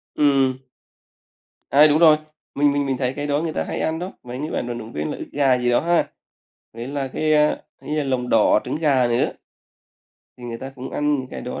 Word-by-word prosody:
Ừm. 135 Hz, -3 st, +3 dB, 1.1 s
À, 150 Hz, +2 st, +7 dB
đúng 150 Hz, +2 st, +3 dB
rồi, 155 Hz, -2 st, +7 dB, 0.4 s
mình 145 Hz, 0 st, +3 dB
mình 145 Hz, 0 st, 0 dB
mình 135 Hz, -2 st, -1 dB
thấy 125 Hz, 0 st, -1 dB
cái 145 Hz, +1 st, -4 dB
đó 145 Hz, +1 st, +1 dB
người 160 Hz, -2 st, -3 dB
ta -, -, -1 dB
hay -, -, -4 dB
ăn 160 Hz, +1 st, -1 dB
đó, 180 Hz, +2 st, -5 dB
mấy 125 Hz, +1 st, -7 dB
cái 155 Hz, +2 st, -3 dB
bạn 120 Hz, -, -2 dB
vận 120 Hz, -1 st, -4 dB
động 115 Hz, 0 st, -9 dB
viên 75 Hz, +1 st, -3 dB
là -, -, -5 dB
ức -, -, -6 dB
gà 135 Hz, -3 st, +3 dB
gì 125 Hz, 0 st, 0 dB
đó 120 Hz, -, +4 dB
ha. 170 Hz, +1 st, +1 dB, 0.7 s
Với 115 Hz, +2 st, -7 dB
là 140 Hz, -1 st, -3 dB
cái, 155 Hz, +3 st, 0 dB
a, 150 Hz, 0 st, +3 dB, 0.3 s
hay -, -, -9 dB
là 150 Hz, -, 0 dB
lòng 125 Hz, -2 st, -1 dB
đỏ 105 Hz, -1 st, +4 dB
trứng -, -, -3 dB
gà 135 Hz, -6 st, +3 dB
này 120 Hz, -, +1 dB
nữa. -, -, +1 dB, 1.1 s
Thì 120 Hz, -, -10 dB
người 115 Hz, -1 st, -5 dB
ta 135 Hz, +1 st, -7 dB
cũng 130 Hz, 0 st, -8 dB
ăn 150 Hz, 0 st, 0 dB
những 130 Hz, -2 st, -3 dB
cái -, -, -6 dB
đó 125 Hz, -, -6 dB
135 Hz, 245 wpm, -22 LUFS, 125-150 Hz, 1.1 s, À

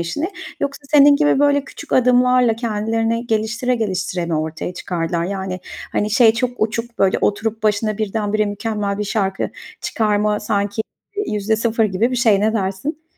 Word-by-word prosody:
işini? 295 Hz, -, -2 dB, 0.3 s
Yoksa 280 Hz, +1 st, -2 dB
senin 285 Hz, -1 st, +7 dB
gibi 295 Hz, -2 st, +3 dB
böyle 285 Hz, -1 st, +3 dB
küçük -, -, -10 dB
adımlarla 250 Hz, -1 st, +4 dB
kendilerini 225 Hz, +1 st, -1 dB
geliştire 230 Hz, +3 st, 0 dB
geliştire 185 Hz, -5 st, -2 dB
mi 170 Hz, -, -1 dB
ortaya 160 Hz, +3 st, -3 dB
çıkardılar? 170 Hz, -1 st, -2 dB
Yani, 190 Hz, -1 st, -4 dB, 0.3 s
hani, 210 Hz, +1 st, 0 dB
şey 225 Hz, 0 st, +6 dB
çok 240 Hz, +2 st, -1 dB
uçuk, 230 Hz, +2 st, -2 dB
böyle, 190 Hz, -1 st, +3 dB
oturup 220 Hz, +1 st, -1 dB
başına 215 Hz, 0 st, +1 dB
birdenbire 215 Hz, 0 st, 0 dB
mükemmel 205 Hz, -1 st, -2 dB
bir 210 Hz, -, -1 dB
şarkı 195 Hz, -2 st, -1 dB, 0.3 s
çıkarma 210 Hz, -1 st, 0 dB
sanki 205 Hz, 0 st, -1 dB, 0.5 s
%0 220 Hz, +2 st, +1 dB
gibi 210 Hz, +5 st, +1 dB
bir 250 Hz, -, -1 dB
şey. 220 Hz, -5 st, +4 dB
Ne 215 Hz, +1 st, +2 dB
dersin? 220 Hz, +10 st, -3 dB
215 Hz, 150 wpm, -19 LUFS, 200-235 Hz, 0.5 s, senin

